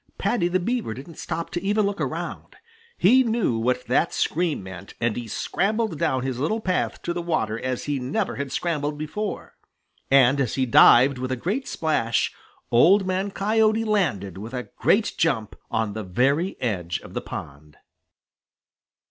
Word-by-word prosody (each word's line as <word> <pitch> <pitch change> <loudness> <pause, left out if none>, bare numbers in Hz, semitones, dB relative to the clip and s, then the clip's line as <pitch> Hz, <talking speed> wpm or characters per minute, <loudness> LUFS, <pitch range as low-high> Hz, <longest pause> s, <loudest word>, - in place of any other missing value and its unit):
Paddy 230 -8 +1
the 180 +1 +1
Beaver 230 - -2
didn't 140 +5 -11
stop 165 0 -4
to 175 - -3
even 205 +1 +1
look 200 +1 -2
around. - - -5 0.4
He 260 +2 +5
knew 225 - 0
what 125 +2 0
that 125 - +2
scream 165 - 0
meant, 95 0 -10
and 115 -2 0
he 120 -1 -5
scrambled 210 - -1
down 130 -1 0
his 130 -2 -3
little 185 +11 0
path 185 -4 -1
to 175 - -2
the 175 - -3
water 115 -10 -1
as 130 0 -3
he 145 -2 -2
never 130 +3 -2
had 140 -2 -4
scrambled 150 -2 -2
before. 195 +7 -5 0.6
And 135 0 +5
as 125 - -1
he 130 - +1
dived 125 +2 +6
with 130 0 -3
a - - +1
great 210 - -3
splash, 135 -8 0 0.4
Old 185 - +5
Man 185 +2 -1
Coyote 215 +2 +2
landed 105 - -1
with 115 +5 -7
a 125 - -5
great 215 +2 +2
jump 120 -10 0
on 110 -2 -1
the 110 0 -4
very 135 - 0
edge 90 -8 -2
of - - -12
the - - -3
pond. 75 +2 -9
145 Hz, 170 wpm, -24 LUFS, 120-195 Hz, 0.6 s, dived